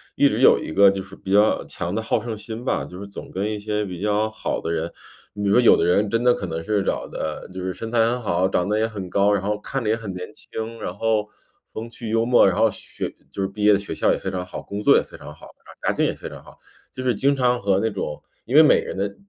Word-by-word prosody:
一 - - +5
直 - - -1
有 - - +7
一 - - -6
个 100 +2 +6
就 100 0 -4
是 95 0 -11
比 95 - -7
较 105 +2 +4
强 85 +3 -4
的 110 - 0
好 - - 0
胜 115 -3 -5
心 110 +2 -7
吧， 130 - -1
就 90 +1 -10
是 100 - -7
总 100 - -9
跟 100 +3 -2
一 105 - -3
些 105 0 -2
比 90 -3 -6
较 105 +1 +1
好 110 - -3
的 80 - -3
人 85 0 -2 0.4
你 105 - -7
比 - - +1
如 - - +4
说 - - +7
有 120 - +7
的 - - +1
人 100 +4 +3
真 115 +3 0
的 125 0 +5
可 - - -5
能 80 -2 -4
是 100 +3 0
长 - - -2
得 80 +3 -5
就 95 0 -6
是 95 0 -2
身 115 - -6
材 120 - -1
很 120 +2 +2
好， 90 -3 +1
长 90 -1 0
得 105 - +1
也 110 - +2
很 100 -5 -7
高， 100 +2 +3
然 100 - +1
后 105 +2 -1
看 135 +3 -4
着 105 - -1
也 110 - +3
很 110 -4 -6
年 90 0 -7
轻， 115 +1 -6
然 90 - -5
后 110 0 0 0.4
风 115 +1 -6
趣 115 -1 -7
幽 115 0 +2
默， 120 +1 +5
然 95 - +1
后 115 - +5
学 - - -6 0.2
就 100 - -5
是 95 - +1
毕 105 +2 -6
业 105 0 +7
的 100 - +3
学 100 - -6
校 - - +2
也 - - +1
非 95 - -4
常 90 -1 -4
好， 90 - -7
工 100 - -6
作 - - +6
也 - - +3
非 - - -12
常 75 - -10
好， - - -14 0.3
家 - - +1
境 - - +1
也 - - 0
非 - - -8
常 - - -11
好。 - - -17 0.3
就 130 - -6
是 125 -3 +1
经 140 +4 +2
常 125 -2 +2
和 100 -1 +2
那 110 - +1
种 95 -7 -5 0.2
因 125 +6 -2
为 155 - +10
每 150 - +5
个 - - -9
人 - - -5
的 100 +1 -2
105 Hz, 325 characters per minute, -23 LUFS, 95-115 Hz, 0.4 s, 为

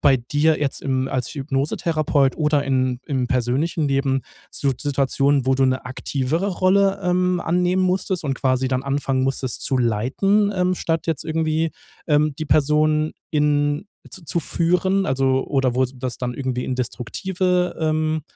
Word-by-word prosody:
bei 140 -2 +5
dir 145 +6 +1
jetzt 140 -2 -1
im 130 -1 -1
als 125 -2 -2
Hypnosetherapeut 140 0 0
oder 150 -2 +2
in 130 -2 0
im 130 -4 -1
persönlichen 135 +6 0
Leben 135 -1 +1 0.3
so 140 - 0
Situationen, 140 -1 +1
wo 130 0 +2
du 135 - +3
'ne 130 0 0
aktivere 140 +7 -2
Rolle, 195 +1 +2
ähm, 180 0 +1
annehmen 180 +2 +1
musstest 185 -1 0
und 135 -2 -1
quasi 130 -1 +1
dann 130 +1 -1
anfangen 135 -1 0
musstest 135 -2 -2
zu 135 - +1
leiten, 130 - +1
ähm, 180 0 +1
statt 165 -1 -2
jetzt 160 - -1
irgendwie, 160 0 0 0.3
ähm, 150 -1 +2
die 155 - -2
Person 155 +1 +2 0.2
in 145 +2 +1 0.2
z 185 -3 -7
zu 170 - +1
führen, 180 +4 +1
also 130 -3 +1
oder 135 -3 +1
wo 130 +1 +3
das 125 -1 -5
dann 125 -1 -3
irgendwie 125 -1 -3
in 130 - -3
destruktive, 180 - -1
ähm, 155 -1 0
145 Hz, 155 wpm, -22 LUFS, 130-165 Hz, 0.3 s, bei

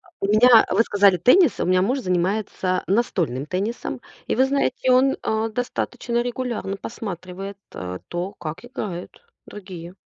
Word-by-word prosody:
У 340 - -6
меня, 225 +2 +6
вы 205 +5 +4
сказали, 200 -4 +4
теннис? 255 - +4
У - - 0
меня 185 0 +3
муж 255 +7 +1
занимается 185 -1 -1
настольным 170 - 0
теннисом. 205 +8 -3 0.3
И - - -1
вы 260 - +5
знаете, 265 -2 0
он, 265 +2 +4
а, 220 +1 0
достаточно 240 0 -2
регулярно 240 -5 -3
посматривает, 195 -2 -7
э, 90 0 -6
то, 180 +4 -4
как 155 +8 -7
играют 210 -9 -6 0.4
другие. 185 -4 -9
205 Hz, 145 wpm, -23 LUFS, 180-240 Hz, 0.4 s, меня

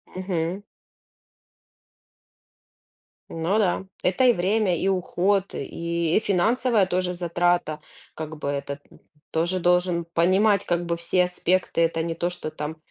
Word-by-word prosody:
Мгм. 185 0 -2 2.7
Ну 165 +5 -1
да. 190 -2 +1 0.2
Это 190 +8 +2
и 245 - +6
время, 190 0 +1
и 195 - 0
уход, 190 +1 0
и 170 +3 -2
и - - +5
финансовая 220 +2 +2
тоже 180 -1 -1
затрата. 175 -2 0 0.3
Как 155 0 -7
бы 145 - -5
этот 140 0 -3 0.5
тоже 170 +3 0
должен 180 -1 +2
понимать 190 +5 +2
как 175 0 0
бы 170 - -1
все 170 +2 +2
аспекты. 180 -1 0
Это 165 0 +1
не 165 0 -3
то, 175 +1 -1
что 165 -3 -6
там, 150 +2 -5
175 Hz, 130 wpm, -24 LUFS, 165-190 Hz, 2.7 s, и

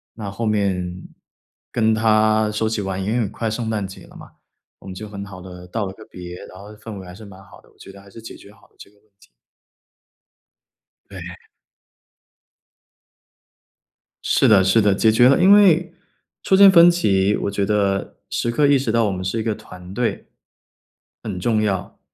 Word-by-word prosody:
那 105 -3 -7
后 115 +4 -5
面 95 -4 -2 0.7
跟 110 -2 +1
他 110 0 +2
说 110 +1 -1
起 110 -1 -2
玩 95 -1 -4
因 100 - -2
为 120 - 0
很 105 -4 -2
快 110 +1 -4
圣 110 0 -4
诞 105 -3 -2
节 95 - -13
了 - - -18
嘛， - - -13 0.5
我 - - -15
们 95 - -8
就 105 +3 -8
很 100 -1 -8
好 100 -2 -11
地 90 -1 -11
道 105 +3 -3
了 95 - -7
个 110 - -14
别， 90 -1 -9
然 95 - -14
后 100 +2 -12
氛 105 0 -10
围 95 - -10
还 90 - -11
是 105 +5 -13
蛮 95 -2 -14
好 95 -1 -18
的， - - -25
我 - - -30
觉 - - -13
得 100 0 -15
还 100 - -18
是 115 - -13
解 115 - -11
决 100 - -16
好 105 0 -23
了 - - -36
这 - - -13
个 105 - -29
问 105 - -36
题。 - - -22 1.8
对。 - - -8 2.9
是 - - +2
的 100 -3 +5
是 95 +4 +3
的， 100 -1 +3
解 110 +3 +2
决 120 +3 +5
了。 140 - +3
因 190 +2 +5
为， 180 -4 +4 0.5
出 190 - +2
现 200 0 +8
分 175 -2 +7
歧， 100 - +1
我 100 - -3
觉 100 0 -1
得 100 -1 -1
时 120 - -2
刻 145 +5 +2
意 140 0 +4
识 130 -4 -2
到 115 0 +2
我 100 - -1
们 95 -1 -5
是 95 +5 -3
一 - - -2
个 110 -1 -2
团 90 -4 -13
队 120 +2 -3 1.0
很 100 -5 -5
重 110 +4 0
要， 95 -4 -3
105 Hz, 220 characters per minute, -20 LUFS, 95-115 Hz, 2.9 s, 现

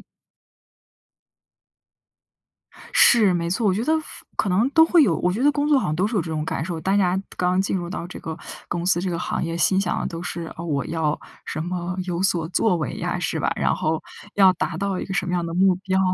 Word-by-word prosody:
嗯。 - - -17 2.9
是， 210 -6 +6
没 170 0 -1
错， 210 +4 0
我 185 - +3
觉 225 +4 -1
得 315 - +2 0.4
可 195 - +1
能 210 +8 +2
都 320 +2 +6
会 330 -1 +5
有 170 - +3
我 180 - +1
觉 230 +6 -2
得 290 +1 +5
工 290 +1 0
作， 290 -3 +5
好 - - -1
像 155 - -1
都 185 +5 +1
是 220 0 -2
有 185 - +2
这 165 - -6
种 155 -1 -2
感 160 - -3
受。 165 -2 -4
大 195 +5 +1
家 185 -1 +2 0.2
刚 180 +1 +1
进 195 0 0
入 175 -1 -4
到 175 - -5
这 180 - -9
个 160 -1 -6 0.3
公 175 0 -3
司、 180 -2 +3
这 185 0 -2
个 170 - -2
行 - - -2
业， 165 0 -3
心 190 +3 +3
想 180 - -1
的 - - -2
都 165 0 -6
是， 175 -1 -4
“啊， 170 - -6
我 145 -4 -1
要 160 -2 -1 0.3
什 155 - -4
么 175 0 -3
有 175 0 -2
所 170 -4 +1
作 185 0 +2
为 155 - -3
呀“， - - -3
是 - - -1
吧？ - - 0
然 - - +1
后 155 0 -1 0.3
要 190 -2 +6
达 165 -1 -3
到 195 0 -2
一 - - -3
个 190 - -6
什 180 - 0
么 180 - -2
样 175 -1 0
的 165 - -4
目 185 0 +4
标 190 0 -1
180 Hz, 260 characters per minute, -23 LUFS, 170-195 Hz, 2.9 s, 是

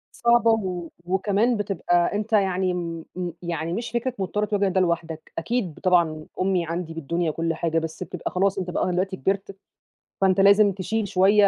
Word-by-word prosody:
صعبة 235 -1 +4
و 185 -6 -1 0.2
وكمان 205 +6 +1
بتبقى 175 -3 +1
أنت 215 +2 -3
يعني 190 -3 +2
امم 165 -2 -4
م 180 -1 -2
يعني 170 -1 -3
مش 230 +5 -3
فكرة 240 +2 -1
مضطر 205 +2 -1
تواجه 205 -2 +1
ده 190 0 +1
لوحدك، 165 -2 -2
أكيد 195 -3 -2
طبعًا 165 -4 +2
أمي 185 -2 +1
عندي 165 0 -4
بالدنيا 165 +1 -1
وكل 165 +1 -1
حاجة، 165 0 0
بس 160 +2 -4
بتبقى - - -5
خلاص 195 +1 +1
أنت 180 -1 -3
بقى 180 +1 0
دلوقتي 190 +2 -1
كبرت، 195 +1 -2 0.7
فأنت 190 0 +3
لازم 200 +1 +6
تشيل 200 +3 -2
شويّة 200 +3 +5
185 Hz, 175 wpm, -24 LUFS, 170-200 Hz, 0.7 s, لازم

